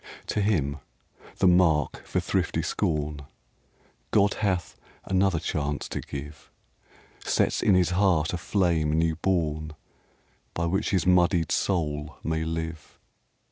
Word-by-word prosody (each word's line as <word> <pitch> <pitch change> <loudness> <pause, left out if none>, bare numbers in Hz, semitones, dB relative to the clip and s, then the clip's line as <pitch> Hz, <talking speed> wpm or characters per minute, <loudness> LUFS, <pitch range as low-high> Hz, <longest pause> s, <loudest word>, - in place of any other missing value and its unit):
To 105 - 0
him, 75 -9 0 0.6
the - - +1
mark 85 -6 +3
for - - 0
thrifty - - -1
scorn, 75 -1 -1 0.9
God 100 0 +3
hath 95 -4 -1 0.3
another 95 -1 +2
chance 75 -2 -2
to - - -4
give, 75 +1 -8 0.7
Sets - - +1
in 100 - +4
his 90 -1 +3
heart 90 -4 +2
a - - -1
flame 85 -5 +1
new 80 0 +1
born 80 -4 -1 0.8
By 85 - -1
which 95 +5 0
his 95 -6 +1
muddied 90 -2 +3
soul 75 -5 -1
may 80 0 -1
live. 80 0 -5
85 Hz, 125 wpm, -26 LUFS, 75-95 Hz, 0.9 s, in